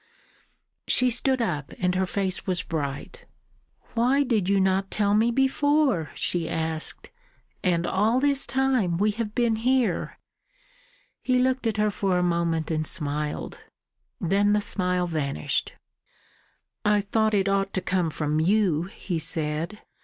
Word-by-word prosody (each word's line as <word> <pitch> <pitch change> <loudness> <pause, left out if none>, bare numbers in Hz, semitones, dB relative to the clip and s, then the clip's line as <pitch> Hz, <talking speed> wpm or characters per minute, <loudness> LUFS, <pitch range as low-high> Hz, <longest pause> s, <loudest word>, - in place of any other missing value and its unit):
She 250 0 +3
stood 255 +1 +1
up, 150 -9 -3
and 180 0 0
her 185 +1 0
face 190 0 -2
was 180 -1 0
bright. 155 - -5 0.7
"Why 255 +5 +3
did 220 -8 0
you 200 0 +3
not 190 0 +1
tell 205 -1 +1
me 220 +3 +3
before?" 270 - +2
she 170 -2 -1
asked. 160 -1 -3 0.5
"And 175 -2 +1
all 215 +8 +2
this 280 0 +1
time 255 -10 +1
we 210 +3 +2
have 215 0 -4
been 235 -2 +2
here!" 250 +1 0 1.0
He 255 -1 +1
looked 255 -1 +1
at 220 -1 -1
her 210 0 +2
for 195 -2 0
a 180 - +1
moment, 170 -2 0
and 155 0 +1
smiled. 150 0 -2 0.6
Then 200 +4 +2
the 210 - +3
smile 180 -3 -1
vanished. 145 - -2 1.1
"I 210 0 +3
thought 215 +1 +1
it 195 -1 +2
ought 195 0 +1
to 185 - 0
come 180 -2 0
from 150 0 -1
you," 175 -2 +2
he 180 -3 -4
said. 160 +4 -2
195 Hz, 145 wpm, -25 LUFS, 170-230 Hz, 1.1 s, She